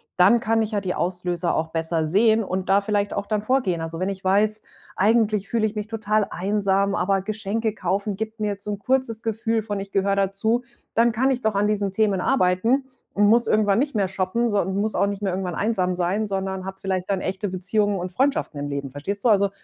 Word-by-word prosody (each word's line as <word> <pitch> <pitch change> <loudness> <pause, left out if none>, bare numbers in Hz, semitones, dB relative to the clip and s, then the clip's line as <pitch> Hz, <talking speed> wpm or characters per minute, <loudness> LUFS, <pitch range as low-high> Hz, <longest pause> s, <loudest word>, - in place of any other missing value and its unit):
dann 195 +6 +5
kann 225 0 +1
ich 215 - -4
ja 205 -2 -1
die 185 -2 -2
Auslöser 175 -1 -1
auch 160 - 0
besser 160 0 0
sehen 220 +6 +4
und 185 -1 -3
da 195 +1 +5
vielleicht 205 0 -1
auch 200 0 -3
dann 210 -1 -1
vorgehen. 215 -8 +1
Also, 165 0 -3
wenn 185 - -1
ich 195 -1 -5
weiß: 210 +3 +2 0.3
„Eigentlich 210 -1 +2
fühle 230 -2 +1
ich 210 - -7
mich 210 0 -4
total 215 -1 0
einsam, 200 +1 +1
aber 195 +1 +1
Geschenke 215 +2 -2
kaufen 200 +3 -1
gibt 220 +2 -5
mir 210 -1 -1
so 210 +1 -5
'n 205 - -4
kurzes 255 -2 0
Gefühl 225 0 -1
von 205 -2 -4
ich 195 0 -9
gehöre 195 0 +1
dazu.“, 200 +4 +1 0.3
dann 235 +1 +4
kann 255 +4 +1
ich 255 -1 -1
doch 220 -2 +1
an 200 +1 +1
diesen 205 -2 0
Themen 205 -1 +1
arbeiten 235 +3 +2 0.3
und 205 0 +3
muss 235 +3 +4
irgendwann 205 -2 +3
nicht 285 -1 -1
mehr 200 -3 +2
shoppen, 190 +5 -1
so 205 -2 +2
muss 200 +3 -1
auch - - +3
nicht 200 0 -4
mehr 195 -2 0
irgendwann 180 -2 -3
einsam 195 -4 0
sein, 180 +5 0
sondern 190 -1 -3
habe 190 0 -7
vielleicht 190 -1 -3
dann 195 - 0
echte 190 +2 -3
Beziehungen 195 +2 0
und 180 +1 -4
Freundschaften 265 - 0
im 145 0 -4
Leben, 140 -1 -4
verstehst 195 +9 -4
du? 245 - +4
Also, 200 -2 +4
200 Hz, 225 wpm, -23 LUFS, 190-220 Hz, 0.3 s, dann